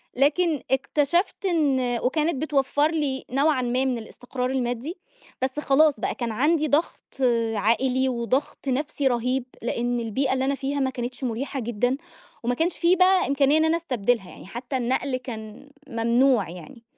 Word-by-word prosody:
لكن 300 +3 +2
اكتشفت 300 +9 +1
إن 265 -9 +1
وكانت 305 +5 +1
بتوفّر 290 0 +1
لي 290 -5 -2
نوعًا 275 +1 +2
ما 250 +2 0
من 255 -2 0
الإستقرار 250 +3 -5
المادّي، 255 +5 -2 0.4
بس 260 +3 -1
خلاص 290 -3 +3
بقى - - -2
كان 235 -2 -3
عَندي 305 +7 +2
ضغْط 300 +4 0 0.5
عائلي 255 +5 +2
وضغْط 255 +4 -2
نَفسي 280 +1 0
رهيب، 250 +1 0 0.2
لإن 240 +1 -1
البيئة 260 +4 0
اللي 265 0 0
أنا 280 +1 +1
فيها 275 +1 -2
ما 265 -1 +1
كانتش 250 +1 -5
مُريحة 260 +3 -3
جدًا، 240 +2 0 0.5
وما 245 - +1
كانش 330 +4 0
في 345 +2 +4
بقى 370 0 +4
إمكانية 280 +1 +3
إن 315 - +3
أنا 325 +1 +2
أستبدلها 245 - -1
يعني - - -12
حتى 245 +6 -4
النقل 255 +2 0
كان 225 0 -9 0.2
ممنوع 235 -2 +2
يعني، 230 +7 -11
265 Hz, 155 wpm, -25 LUFS, 245-290 Hz, 0.5 s, في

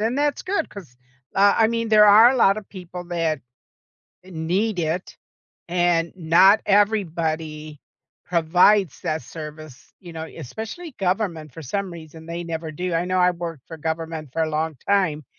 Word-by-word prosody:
and 230 +5 0
that's 290 -2 0
good 370 -4 -1
'cause, 160 -12 -12 0.4
uh, 200 +1 +5
I 225 - +5
mean, 230 -1 -2
there 215 -1 +7
are 220 +4 +8
a 265 - 0
lotta 215 -2 +3
people 180 -2 -9
that 165 -4 -1 0.8
need 185 +4 -2
it 165 +2 -3 0.5
and 175 -1 +1
not 180 +5 +5
everybody 160 -7 0 0.5
provides 180 +1 +3
that 155 +1 -1
service, 155 -1 -10
you 175 -3 -11
know, 160 0 -5
especially 220 - -8
government 180 - -2
for 165 - -10
some 195 +6 -3
reason, 160 -1 -11
they 170 +1 -5
never 160 -1 -5
do. 180 +2 -3
I 165 +2 +1
know 185 0 0
I 180 0 +4
worked 170 -5 -7
for 165 - -8
government 160 -2 -4
for 165 - 0
a 160 - 0
long 155 0 -2
time, 180 -8 +1
170 Hz, 160 wpm, -23 LUFS, 160-200 Hz, 0.8 s, are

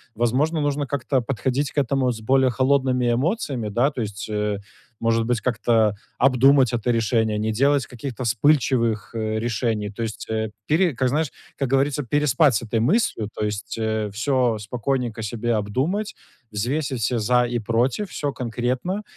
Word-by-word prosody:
Возможно, 130 +8 +1
нужно 145 0 0
как-то 135 0 0
подходить 130 +3 -1
к 145 - +2
этому 135 -1 +1
с 115 - -6
более 130 +3 +3
холодными 130 -1 +2
эмоциями, 135 - -1
да? 120 +7 +2
То 130 - -4
есть, 105 -1 -5
э, 105 -1 -1 0.4
может 115 0 +2
быть, 120 0 0
как-то 110 -2 +2 0.2
обдумать 130 0 +4
это 120 +1 0
решение, 110 -2 +1
не 110 +1 0
делать 140 +4 +2
каких-то 125 +1 -6
вспыльчивых, 120 -4 +1
э, 110 -1 -1
решений. 110 -2 -1
То 105 +3 -5
есть, 110 -1 -5
э, 110 0 -1 0.2
пире 165 +2 +3
как, 130 +1 0
знаешь, 150 +2 0 0.3
как 135 -3 -1
говорится, 140 +2 +2
переспать 145 +1 +3
с 110 - -1
этой 110 0 0
мыслью, 120 - +1
то 105 - -2
есть, 105 +1 -4
э, 110 -1 -1
всё 120 +1 +1
спокойненько 120 +1 -2
себе 115 +2 -1
обдумать, 135 - -1 0.4
взвесить 130 +5 -2
все 120 +3 0
"за 125 +3 +3
и 120 0 -1
против", 120 - 0
всё 145 -2 -3
конкретно, 125 - -2
120 Hz, 165 wpm, -23 LUFS, 110-135 Hz, 0.4 s, обдумать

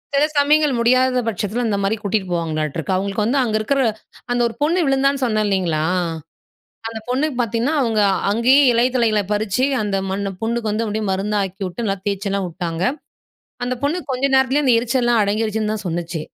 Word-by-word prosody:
சில 285 +2 +4
சமயங்கள் 295 0 +4
முடியாத 255 +1 +3
பட்சத்தில 215 +3 -2
இந்தமாரி 200 +1 0
கூட்டிட்டு 200 -1 -1
போவாங்களாட்ருக்கு. 160 +1 -2
அவுங்களுக்கு 200 +2 -1
வந்து, 265 +5 +1
அங்க 220 -3 -1
இருக்கிற 275 +6 0 0.5
அந்த 245 0 +1
ஒரு 230 - -8
பொண்ணு 335 +3 +2
விழுந்தான்னு 270 0 +1
சொன்னேன் 215 -3 +1
இல்லேங்களா! 175 -6 0 1.1
அந்த 225 -1 -6
பொண்ணுக்கு 270 +2 0
பாத்தீங்கன்னா, 235 +7 -1
அவுங்க 225 -3 +1 0.3
அங்கேயே 250 +6 +4
இலை 235 +2 +3
தழைகள 220 -4 +2
பறிச்சி, 215 +4 0 0.2
அந்த 200 -2 -1
மண்ணு 195 0 -2
புண்ணுக்கு 225 -1 -1
வந்து 220 +2 -1
அப்பிடியே 215 0 -2
மருந்தாக்கிவுட்டு 195 +1 -2
நல்லா 195 -2 -1
தேய்ச்சலாம் 200 -1 -2
உட்டாங்க. 170 0 -4 0.8
அந்த 250 +1 -1
பொண்ணு 315 +5 0
கொஞ்ச 255 +2 -2
நேரத்திலயே 265 +3 +2
அந்த 250 -3 +4
எரிச்சல்லாம் 240 -1 +1
அடங்கிருச்சுன்னு 215 +1 -1
தான் 210 -2 -6
சொன்னுச்சு. 170 -1 -3
220 Hz, 160 wpm, -20 LUFS, 195-250 Hz, 1.1 s, சில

